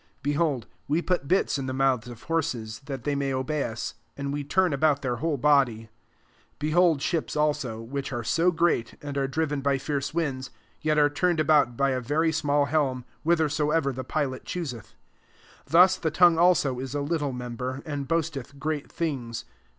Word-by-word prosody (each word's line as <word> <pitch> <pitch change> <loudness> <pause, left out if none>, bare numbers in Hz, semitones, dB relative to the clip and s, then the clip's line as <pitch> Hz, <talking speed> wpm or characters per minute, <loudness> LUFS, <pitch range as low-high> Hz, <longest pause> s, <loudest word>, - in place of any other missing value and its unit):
3 145 - +1
Behold, 145 -6 0 0.2
we 150 +3 +2
put 175 -4 -1
bits 180 -4 +2
in 135 - -4
the 130 - -3
mouths 130 -4 +1
of 120 -2 -10
hor 165 0 +1
ses, 110 -6 -5
that 135 -4 -5
they 145 - 0
may 140 -1 -1
obey 135 +3 -1
us: 115 +1 -4 0.2
and 140 0 -3
we 145 0 -2
turn 180 +3 +2
about 145 0 +2
their 125 -2 -1
whole 155 +2 -1
body. 135 -5 +3
4 110 - -18 0.7
Behold 155 0 +3
ships 165 -3 -1
also, 150 -6 0
which 135 +5 -5
are 120 -3 -3
so 165 +9 +2
great, 165 -9 +1
and 145 -1 -5
are 135 -1 0
driven 145 0 -1
by 140 0 +2
fierce 140 +1 -2
winds, 135 -6 -2 0.3
yet 155 0 +1
are 145 -1 +6
turned 170 +3 0
about 145 -6 +3
by 140 0 +2
a 130 -1 -1
very 155 +6 +1
small 145 -2 +1
helm, 140 -4 0 0.2
whithersoever 155 -3 +1
the 130 +1 -5
pilot 130 -1 -2
choos 170 -7 -4
eth. 115 - -14 0.7
5 - - -19
Thus 185 +3 +7
the 160 - -1
tongue 170 +1 +5
also 165 -8 +3
is 130 +1 -5
a 145 - 0
little 145 -1 -1
member, 125 +2 -5
and 145 -3 -4
boasteth 150 -5 -2
great 150 0 -3
things. 130 -9 -3
145 Hz, 195 wpm, -26 LUFS, 130-155 Hz, 0.7 s, Thus